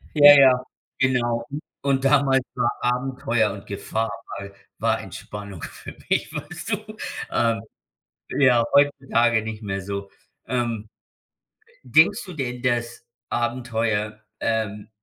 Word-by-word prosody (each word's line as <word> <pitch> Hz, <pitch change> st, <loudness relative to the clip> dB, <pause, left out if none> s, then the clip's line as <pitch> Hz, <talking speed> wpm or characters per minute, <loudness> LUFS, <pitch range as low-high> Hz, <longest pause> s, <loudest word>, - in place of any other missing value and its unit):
Ja, 145 Hz, -1 st, +10 dB
ja, 130 Hz, -2 st, +6 dB, 0.3 s
genau. 120 Hz, -3 st, +1 dB, 0.4 s
Und 135 Hz, -1 st, +1 dB
damals 135 Hz, -2 st, +4 dB
war 120 Hz, -1 st, +1 dB
Abenteuer 125 Hz, -3 st, +1 dB
und 100 Hz, 0 st, -10 dB
Gefahr 105 Hz, +2 st, -2 dB, 0.3 s
war 100 Hz, 0 st, -8 dB, 0.3 s
war -, -, +1 dB
Entspannung 100 Hz, -4 st, -8 dB
für -, -, -9 dB
mich, -, -, 0 dB
weißt -, -, -6 dB
du? -, -, -8 dB, 0.4 s
Ähm, 115 Hz, -1 st, +2 dB, 0.7 s
ja, 125 Hz, -4 st, +4 dB
heutzutage 125 Hz, -5 st, +3 dB
nicht 110 Hz, 0 st, -6 dB
mehr 100 Hz, -1 st, -3 dB
so. 100 Hz, 0 st, -5 dB, 0.4 s
Ähm, 115 Hz, -4 st, -2 dB, 0.9 s
denkst 200 Hz, +9 st, +4 dB
du 185 Hz, -, -9 dB
denn, 125 Hz, -3 st, -4 dB
dass 120 Hz, -1 st, -1 dB, 0.3 s
Abenteuer 115 Hz, -3 st, -1 dB, 0.2 s
ähm, 105 Hz, -2 st, -1 dB
120 Hz, 115 wpm, -24 LUFS, 110-130 Hz, 0.9 s, Ja